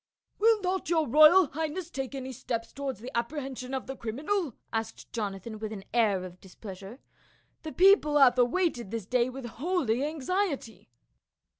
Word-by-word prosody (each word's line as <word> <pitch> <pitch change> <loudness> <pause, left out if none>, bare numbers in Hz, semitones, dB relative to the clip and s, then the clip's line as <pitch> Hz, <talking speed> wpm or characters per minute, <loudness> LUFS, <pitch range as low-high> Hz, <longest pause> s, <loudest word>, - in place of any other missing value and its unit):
"Will 445 0 +5
not 370 -1 -2
your 320 -3 +2
royal 310 +5 +7
highness 320 +3 -4
take 270 -2 -4
any 265 -1 -5
steps 230 -1 -4
to 280 - -10
wards 265 -7 -4
the 255 +3 -8
apprehension 260 +1 -3
of 260 - -4
the 270 - -6
criminal?" 285 - -2 0.2
asked 225 0 -4
Jona 205 -4 -3
than, 215 +2 -8
with 215 0 -5
an 200 -3 -7
air 210 -6 +2
of 180 0 -12
displeasure, 195 +3 -10 0.3
" - - -37
the 315 - -6
people 360 -6 +5
have 255 -3 +6
awaited 245 - +1
this 225 -2 -4
day 245 +3 +1
with 260 0 -8
holy 260 0 -1
anxiety." 305 - -2
260 Hz, 170 wpm, -28 LUFS, 225-315 Hz, 0.3 s, royal